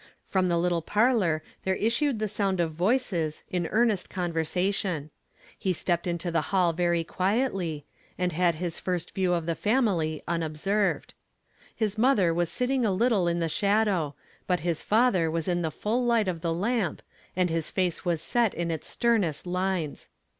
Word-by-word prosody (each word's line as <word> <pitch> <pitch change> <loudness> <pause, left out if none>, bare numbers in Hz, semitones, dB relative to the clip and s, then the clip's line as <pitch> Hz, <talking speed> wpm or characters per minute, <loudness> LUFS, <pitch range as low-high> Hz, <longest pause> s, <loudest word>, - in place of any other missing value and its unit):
From 185 -1 +1
the 170 -1 +2
little 170 0 +1
parh»r 205 -5 +2 0.2
there 190 0 0
issued 235 +5 +1
the 215 0 -1
so'.nd 195 -2 -1
of 165 -2 +1
voices 175 -3 0
m 175 -2 0
earnest 220 -4 +1
convei 175 -2 -3
sation. 175 -1 -1 0.5
Jle 185 -2 +1
steppe., 175 +1 -1
into 170 0 -2
the 165 -1 +2
hall 180 -3 +3
very 170 0 +1
quietly, 185 - -1 0.3
and 180 0 0
Iiad 170 0 +2
liis 170 +1 -4
fn 180 -1 0
st - - -11
view 185 -2 +1
of 170 -2 -1
the 165 - 0
family 190 - +1
unobserved. 170 +5 -1 0.6
His 215 -1 -1
mother 220 -9 +4
was 170 0 0
sitting 255 0 0
a 215 - +2
little 200 -2 +2
in 170 0 +1
the 165 -1 0
shadow; 200 -5 +1 0.3
but 180 -3 +1
his 170 -1 -1
father 210 -7 +3
was 165 +1 -2
in 175 -1 +1
the 160 - 0
fnll 215 - -1
light 230 -4 +3
of 170 -3 -2
the 165 -1 -1
lamp, 200 +2 -1 0.3
and 180 -2 +1
his 165 -1 -1
fa(H. 180 -3 -1
was 170 -3 -1
set 235 +4 +1
in 170 -1 -2
its 160 - -4
sternest 205 -12 +1
Inies. 180 -4 -2
180 Hz, 175 wpm, -27 LUFS, 165-210 Hz, 0.6 s, mother